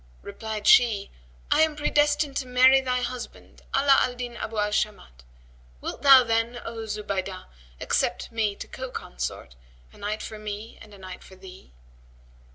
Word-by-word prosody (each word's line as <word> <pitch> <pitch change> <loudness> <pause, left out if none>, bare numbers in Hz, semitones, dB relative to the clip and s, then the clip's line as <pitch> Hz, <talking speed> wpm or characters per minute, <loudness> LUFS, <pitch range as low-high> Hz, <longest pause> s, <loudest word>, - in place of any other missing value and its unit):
Replied 220 -1 -6
she, 220 -5 +5 0.4
'I - - +5
am 315 -1 +3
predestined 295 -1 +1
to 260 - -3
marry 255 +2 +6
thy 250 -1 -1
husband, 250 0 -7
Ala 275 0 +5
al 245 - 0
Din 245 -1 -6
Abu 225 -1 -6
al 210 0 +1
Shamat: 70 - -3 0.6
wilt - - -6
thou 270 -2 +8
then, 230 +1 0
O 225 -1 -6
Zubaydah, 195 -3 -4 0.3
accept - - -1
me 220 -3 0
to - - -8
co 260 0 -7
consort, - - -6 0.4
a - - -17
night 210 +1 -3
for 215 - -8
me 210 +1 -7
and 210 - -14
a - - -14
night 185 -1 -10
for 190 - -15
thee?' 185 - -14
225 Hz, 165 wpm, -25 LUFS, 205-255 Hz, 0.6 s, thou